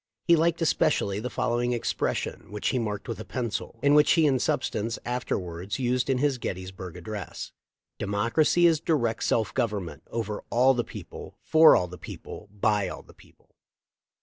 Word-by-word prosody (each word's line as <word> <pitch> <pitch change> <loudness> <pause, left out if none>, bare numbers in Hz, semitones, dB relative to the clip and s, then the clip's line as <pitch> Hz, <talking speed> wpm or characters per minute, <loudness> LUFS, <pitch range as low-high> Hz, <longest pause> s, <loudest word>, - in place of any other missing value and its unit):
He 170 - +6
liked 165 +1 +1
especially 105 -10 +1
the 125 +4 -4
following 120 0 0
expression, 120 - -2
which 105 0 -1
he 130 - 0
marked 105 -1 -3
with 115 -3 -4
a - - -5
pencil, 115 -2 -4
and 140 0 +5
which 150 0 +6
he 165 -2 +4
in 135 -3 +3
substance 115 -1 -1
afterwards 95 -6 -3
used 125 0 0
in 135 - +2
his 135 -1 +1
Gettysburg 95 -3 -6
address: 100 +2 -6 0.5
''De 100 - -3
mocracy 115 - +2
is 160 -2 +3
direct 120 -9 0
self 110 -2 +1
government, 100 - -2
over 110 -2 -4
all 130 +3 +4
the 120 -2 0
people, - - -10
for 160 0 +7
all 90 - +1
the 90 -1 -11
people, - - -9
by 105 -1 +1
all - - -7
the - - -18
people." - - -23
115 Hz, 175 wpm, -27 LUFS, 100-135 Hz, 0.5 s, for